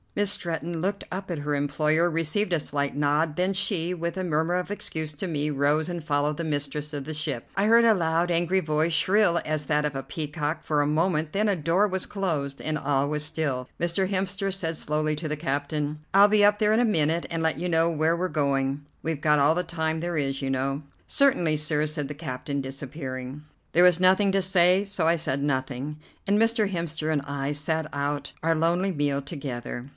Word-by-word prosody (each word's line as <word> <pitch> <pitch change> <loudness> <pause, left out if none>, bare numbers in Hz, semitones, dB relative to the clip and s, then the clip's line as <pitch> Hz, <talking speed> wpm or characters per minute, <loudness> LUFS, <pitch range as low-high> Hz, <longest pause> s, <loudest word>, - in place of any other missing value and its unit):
Miss 205 -1 +1
Stretton 170 -4 -3
looked 195 +2 -2
up 190 0 -5
at 165 - -3
her 145 0 -1
employer, 155 +4 +1
received 165 +5 0
a 170 - +2
slight 140 -1 -3
nod, 150 +1 +1
then 185 +2 +1
she, 185 -3 +1
with 170 +1 -4
a 185 - -2
murmur 160 +1 0
of 180 +1 -2
excuse 160 -6 -3
to 150 +6 -5
me, 150 -3 -1
rose 145 +2 +1
and 175 -2 -5
followed 150 0 0
the 170 - -4
mistress 150 -1 -3
of 145 -3 -5
the 155 - -5
ship. 150 -5 -3
I 195 - +2
heard 230 +1 +6
a 225 - +6
loud, 170 -2 +1
angry 175 +2 +2
voice, 155 -1 0
shrill 185 +1 +3
as 155 -1 -2
that 150 0 +1
of 150 -2 -2
a 135 - -3
peacock, 150 +1 -3
for 150 -1 +1
a 145 - +1
moment, 155 0 +1
then 210 +5 +1
a 200 - +2
door 170 +5 +2
was 190 -1 -3
closed, 155 -9 -2
and 155 -1 -1
all 140 -1 0
was 150 0 -1
still. 150 -5 -2
Mr. 175 +2 0
Hemster 195 0 -1
said 165 -4 -1
slowly 155 0 -1
to 155 +1 -5
the 150 - -2
captain: 145 0 -2
"I'll 200 +1 +8
be 210 0 +3
up 205 0 +5
there 210 0 +2
in 225 - +3
a - - +3
minute 165 -5 +1
and 165 -1 -2
let 160 -1 0
you 180 +1 -2
know 165 0 +3
where 160 +1 +1
we're 185 +2 0
going. 140 -3 0 0.2
We've 160 -2 -2
got 150 -1 +3
all 145 +3 +4
the 180 - 0
time 160 -2 -2
there 175 -1 -2
is, 135 -2 -1
you 135 - -2
know." 135 +2 -1 0.3
"Certainly, 180 - +3
sir," 150 0 +3
said 150 -2 -3
the 150 - -6
captain, 140 -1 -4
disappearing. 135 0 -6 0.3
There 175 - +5
was 180 -1 +5
nothing 190 +2 +4
to 195 - +3
say, 185 0 +4
so 200 -5 -1
I 165 - +4
said 140 -4 -2
nothing, 140 +1 -2 0.3
and 200 +1 +3
Mr. 225 -1 +2
Hemster 165 -3 -2
and 145 - 0
I 140 0 -3
sat 155 +2 -1
out 145 +1 -3
our 165 0 +2
lonely 170 +4 +1
meal 145 -3 0
together. 135 -3 -6
160 Hz, 215 wpm, -26 LUFS, 145-180 Hz, 0.3 s, I'll